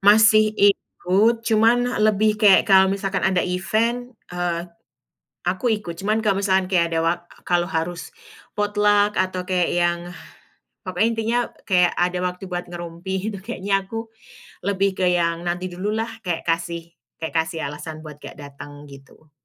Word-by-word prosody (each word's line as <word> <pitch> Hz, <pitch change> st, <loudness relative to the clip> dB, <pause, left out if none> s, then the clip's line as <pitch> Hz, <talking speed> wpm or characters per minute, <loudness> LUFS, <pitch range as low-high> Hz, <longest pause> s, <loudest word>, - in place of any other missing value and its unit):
Masih 215 Hz, +1 st, +6 dB
ikut, 205 Hz, +3 st, +2 dB
cuman 230 Hz, +2 st, +2 dB
lebih 215 Hz, 0 st, +2 dB
kayak 200 Hz, -3 st, +6 dB
kalau 190 Hz, -1 st, +6 dB
misalkan 195 Hz, 0 st, -1 dB
ada 190 Hz, -1 st, +1 dB
event, 230 Hz, +7 st, -1 dB, 0.2 s
eee, 175 Hz, -1 st, -2 dB, 0.8 s
aku 185 Hz, +7 st, -1 dB
ikut. 190 Hz, -5 st, -7 dB
Cuman 215 Hz, +3 st, 0 dB
kalau 200 Hz, -2 st, +2 dB
misalkan 190 Hz, -2 st, +1 dB
kayak 170 Hz, -2 st, +2 dB
ada 165 Hz, -, +1 dB
wak 170 Hz, +1 st, +1 dB, 0.3 s
kalau 175 Hz, -1 st, +1 dB
harus 165 Hz, -1 st, -3 dB, 0.5 s
potluck, 205 Hz, 0 st, +2 dB
atau 185 Hz, -1 st, -2 dB
kayak 180 Hz, -1 st, 0 dB
yang 175 Hz, 0 st, +2 dB, 0.9 s
pokoknya 185 Hz, +2 st, +1 dB
intinya 225 Hz, +1 st, 0 dB, 0.3 s
kayak 180 Hz, -3 st, +4 dB
ada 180 Hz, 0 st, +1 dB
waktu 180 Hz, +1 st, -3 dB
buat 180 Hz, -1 st, -4 dB
ngerumpi, 175 Hz, +2 st, -6 dB, 0.2 s
itu 200 Hz, -, -6 dB
kayaknya 195 Hz, -3 st, -1 dB
aku 225 Hz, +1 st, -5 dB, 0.6 s
lebih 195 Hz, 0 st, +1 dB
ke 185 Hz, -, +2 dB
yang 170 Hz, -1 st, 0 dB
nanti 180 Hz, +1 st, -2 dB
dululah, 210 Hz, +5 st, -2 dB, 0.2 s
kek 170 Hz, -2 st, -2 dB
kasih 170 Hz, 0 st, -2 dB, 0.3 s
kek 160 Hz, -, -4 dB
kasih 160 Hz, 0 st, -1 dB
alasan 155 Hz, +2 st, -8 dB
buat 150 Hz, -2 st, -10 dB
gak -, -, -10 dB
datang, 145 Hz, 0 st, -10 dB
gitu. 140 Hz, +2 st, -16 dB
185 Hz, 150 wpm, -22 LUFS, 175-210 Hz, 0.9 s, Masih